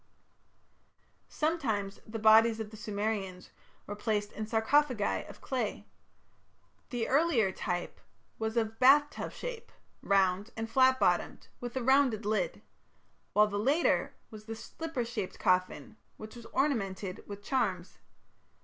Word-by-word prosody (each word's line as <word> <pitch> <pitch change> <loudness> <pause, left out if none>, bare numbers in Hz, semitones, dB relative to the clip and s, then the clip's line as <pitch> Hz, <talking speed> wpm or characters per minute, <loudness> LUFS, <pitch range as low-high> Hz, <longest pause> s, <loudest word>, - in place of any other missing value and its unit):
Sometimes 230 -12 -1
the 220 +1 -5
bodies 220 +1 +5
of 220 -1 -5
the - - -10
Sumerians 205 -3 -4 0.3
were 205 - -6
placed 210 -1 -1
in 215 0 -5
sarcophagi 230 +1 +1
of - - -12
clay. 245 -6 -3 1.0
The 240 -4 -2
earlier 270 - +3
type 180 -2 -4 0.4
was 220 +1 -2
of 225 -1 -1
"bath 290 +3 +6
tub" - - -6
shape, - - -7 0.3
round 195 +1 +2
and 225 0 -3
flat 260 +2 +4
bottomed, - - 0
with 245 0 -6
a 255 - -2
rounded 260 -5 +3
lid, 215 0 -1 0.7
while 210 0 +6
the 205 -1 -3
later 280 +10 +1 0.2
was 215 -1 -11
the 225 0 -6
"slipper 280 +2 -5
shaped 230 -5 -5
coffin", 185 +5 0 0.2
which 215 +2 -10
was 235 -1 -11
ornamented 200 -9 -1
with 205 0 -8
charms. 200 -9 -2
220 Hz, 130 wpm, -31 LUFS, 205-260 Hz, 1.0 s, bath